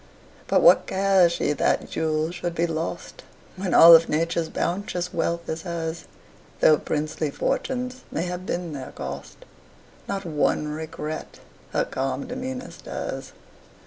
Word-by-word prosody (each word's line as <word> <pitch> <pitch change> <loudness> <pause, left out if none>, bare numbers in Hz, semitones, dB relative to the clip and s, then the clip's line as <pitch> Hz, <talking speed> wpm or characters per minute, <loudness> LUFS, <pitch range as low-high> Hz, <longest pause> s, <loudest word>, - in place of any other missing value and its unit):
But - - +3
what - - +6
cares 190 -2 +4
she 150 - 0
that 145 - +1
jewels 155 +1 0
should 175 -1 -4
be 170 - +2
lost, 165 +1 -4 0.3
When 185 0 -1
all 170 0 +11
of 165 0 +4
Nature's 165 +1 0
bounteous 180 0 -2
wealth 170 0 -1
is 160 +1 -3
hers? 170 -1 -4 0.5
Though 155 - +6
princely 155 0 -2
fortunes 250 - -2
may 165 - -1
have 180 0 -4
been 175 -2 -3
their 135 -2 -7
cost, 70 +1 -8 0.6
Not 195 -1 -3
one 150 -1 0
regret 155 0 -6 0.3
her - - +1
calm 135 - -3
demeanor 255 +1 -5
stirs. - - -6
170 Hz, 140 wpm, -24 LUFS, 155-180 Hz, 0.6 s, all